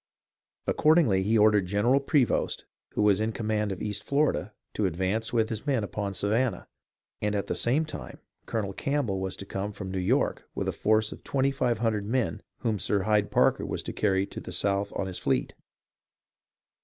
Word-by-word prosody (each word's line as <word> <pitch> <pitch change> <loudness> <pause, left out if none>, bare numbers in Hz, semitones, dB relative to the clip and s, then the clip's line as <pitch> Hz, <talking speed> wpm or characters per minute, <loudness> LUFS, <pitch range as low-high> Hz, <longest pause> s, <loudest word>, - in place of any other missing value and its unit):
Accord 155 +2 +4
ingly 110 - +4
he 110 +4 +2
ordered 105 -3 +4
General 105 +8 +3
Prevost, 140 -2 +1 0.3
who - - +2
was 105 -1 +4
in 110 +1 0
command 105 -2 -1
of 95 - -5
East 105 -1 -2
Florida, 145 +2 +1 0.2
to 105 - +1
advance 95 +6 -1
with 115 -2 +2
his 110 +5 -5
men 130 -6 +2
upon 100 -1 -3
Savannah, 110 +3 0 0.5
and 105 0 0
at 100 - -1
the - - -2
same 140 +7 +1
time 155 - -8 0.3
Colonel 100 -4 -2
Campbell 135 -6 -1
was 95 0 -3
to 100 - -8
come 100 +1 -3
from 100 -2 -6
New 95 - -2
York 90 - 0
with - - -2
a - - +1
force 110 0 +2
of - - -10
twenty 135 0 +1
five 125 -4 0
hundred 110 -3 0
men 125 +1 0 0.2
whom 110 -4 0
Sir 100 0 +1
Hyde 105 -1 +2
Parker - - +3
was - - -3
to - - -5
carry 95 -2 +1
to - - -8
the - - -8
South 100 0 0
on - - -1
his 95 -1 -5
fleet. 65 -3 0
105 Hz, 190 wpm, -28 LUFS, 100-120 Hz, 0.5 s, Accord